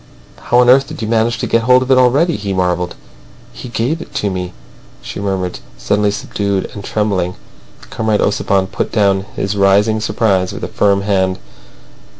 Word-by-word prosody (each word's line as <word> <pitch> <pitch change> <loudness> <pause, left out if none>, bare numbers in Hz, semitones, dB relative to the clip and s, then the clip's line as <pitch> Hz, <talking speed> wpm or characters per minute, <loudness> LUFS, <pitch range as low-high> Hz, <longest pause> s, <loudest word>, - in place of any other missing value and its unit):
"How 120 - +2
on 125 0 +5
earth 135 +1 +4
did 115 - -7
you - - -2
manage 115 +1 +1
to - - -3
get 115 - +2
hold 125 +1 +5
of 130 - -3
it 130 - +6
already?" 140 +7 +3
he 100 -1 -3
marvelled. 90 -1 -1 0.6
"He 125 - -9
gave 125 +8 -1
it - - -12
to 100 - -1
me," 90 -1 -4 0.5
she - - -7
murmured, 95 -3 -2 0.2
suddenly 105 0 +1
subdued 100 -1 -2
and 100 - -8
trembling. 95 -4 -1 0.6
Comrade 110 -2 0
Ossipon 100 -2 +1
put - - -4
down 100 -2 +1
his 100 +1 -2
rising 100 +3 +3
surprise 105 -4 0
with - - -8
a - - -2
firm 100 -1 +1
hand. 95 -2 0
100 Hz, 175 wpm, -16 LUFS, 95-115 Hz, 0.6 s, it